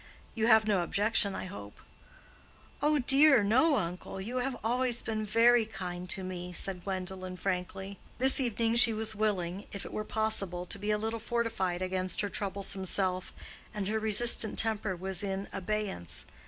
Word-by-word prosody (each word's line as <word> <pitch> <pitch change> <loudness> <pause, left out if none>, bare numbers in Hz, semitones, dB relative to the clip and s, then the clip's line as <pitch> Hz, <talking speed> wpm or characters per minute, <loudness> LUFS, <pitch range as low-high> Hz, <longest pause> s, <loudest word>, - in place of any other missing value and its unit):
You 225 -1 -1
have 220 -2 +4
no 200 -4 +1
objection, 200 +2 +1
I - - -6
hope?" 100 - -11 1.0
"Oh 300 +1 +2
dear, 275 -2 +4
no, 260 +9 +3
uncle. 180 0 -5
You 230 +7 -5
have 255 0 -2
always 245 +1 0
been 215 -1 -3
very 230 +2 +4
kind 180 -4 -7
to 190 - +1
me," 180 -1 -7
said 180 0 -2
Gwendolen, 185 -1 -5
frankly. 190 +1 -5 0.2
This 265 +3 +6
evening 230 -2 0
she 235 -1 +6
was 220 0 +3
willing, 200 -3 -3
if 200 - -7
it - - -10
were 215 - -3
possible, 205 -5 +1
to 200 - -3
be 205 +1 -4
a 210 - +1
little 225 +2 -4
fortified 220 -6 -2
against 185 -1 0
her 205 - -3
troublesome 195 -1 -3
self, 185 -1 +1 0.4
and 200 -2 -3
her 220 +1 -1
resistant 220 0 +4
temper 215 -3 +1
was 185 0 -1
in 195 0 -4
abeyance. 200 - -3
205 Hz, 170 wpm, -29 LUFS, 185-225 Hz, 1.0 s, This